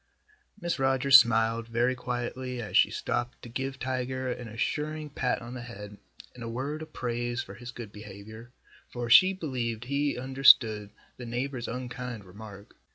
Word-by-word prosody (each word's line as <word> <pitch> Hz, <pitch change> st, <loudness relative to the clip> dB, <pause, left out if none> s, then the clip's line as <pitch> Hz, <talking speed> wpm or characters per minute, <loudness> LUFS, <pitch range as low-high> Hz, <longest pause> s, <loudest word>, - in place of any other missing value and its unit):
Mrs. 175 Hz, -5 st, -2 dB
Rogers 135 Hz, 0 st, +7 dB
smiled 115 Hz, 0 st, +1 dB
very 120 Hz, +2 st, +1 dB
quietly 125 Hz, 0 st, -4 dB
as 110 Hz, -3 st, -5 dB
she -, -, +6 dB
stopped 120 Hz, 0 st, -3 dB
to 120 Hz, -, -8 dB
give 135 Hz, +3 st, -4 dB
Tiger 130 Hz, 0 st, -2 dB
an 125 Hz, -1 st, -6 dB
assuring 150 Hz, +7 st, -3 dB
pat 125 Hz, -3 st, -1 dB
on 120 Hz, +1 st, -8 dB
the 125 Hz, -, -6 dB
head 105 Hz, -3 st, -9 dB, 0.3 s
and 120 Hz, -, -10 dB
a 115 Hz, -, -4 dB
word 140 Hz, +6 st, -4 dB
of 160 Hz, -, -9 dB
praise 120 Hz, 0 st, -2 dB
for -, -, -11 dB
his 120 Hz, 0 st, -10 dB
good 120 Hz, -3 st, -8 dB
behavior, 105 Hz, +3 st, -11 dB, 0.4 s
for 120 Hz, -1 st, -4 dB
she 185 Hz, +10 st, +8 dB
believed 125 Hz, -, -3 dB
he 140 Hz, +2 st, -1 dB
understood 125 Hz, -5 st, +5 dB, 0.3 s
the 125 Hz, -, -8 dB
neighbor's 125 Hz, +1 st, -3 dB
unkind 125 Hz, -3 st, -5 dB
remark. 100 Hz, +1 st, -12 dB
120 Hz, 160 wpm, -28 LUFS, 115-130 Hz, 0.4 s, she